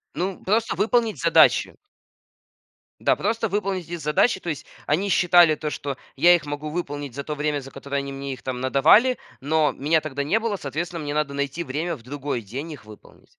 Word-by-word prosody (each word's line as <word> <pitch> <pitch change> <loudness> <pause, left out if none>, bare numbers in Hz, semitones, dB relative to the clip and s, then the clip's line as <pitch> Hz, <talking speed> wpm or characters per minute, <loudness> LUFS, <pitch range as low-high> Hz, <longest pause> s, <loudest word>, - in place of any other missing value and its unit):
Ну, 185 +1 -3
просто 220 +3 +1
выполнить 230 -1 +1
задачи. - - +4 1.3
Да, - - +3
просто 225 0 -1
выполнить 195 -2 -2
эти 175 - -3
задачи. 160 +6 +1
То 175 - -6
есть 150 - -4 0.2
они 185 +7 0
считали 175 -3 +5
то, 150 0 -4
что 140 -2 -4 0.2
я 175 +1 +6
их 165 - -3
могу 145 +1 -5
выполнить 145 -5 -5
за 140 - -4
то 150 - -4
время, 150 0 -1
за 135 0 -11
которое 140 +1 -5
они 140 0 -3
мне 135 0 -5
их 130 - -12
там 125 -1 -4
надавали, 160 - +5 0.2
но 155 +2 +2
меня 155 +3 +2
тогда 140 -2 -3
не 200 +10 +1
было. 225 -2 -1
Соответственно, 170 +2 -4
мне 145 - -3
надо 150 -2 0
найти 140 +4 -2
время 160 +4 -3
в 120 - -16
другой 140 -1 -4
день 130 +10 -7
их 145 -7 -10
выполнить. 105 -1 -16
150 Hz, 195 wpm, -24 LUFS, 140-175 Hz, 1.3 s, я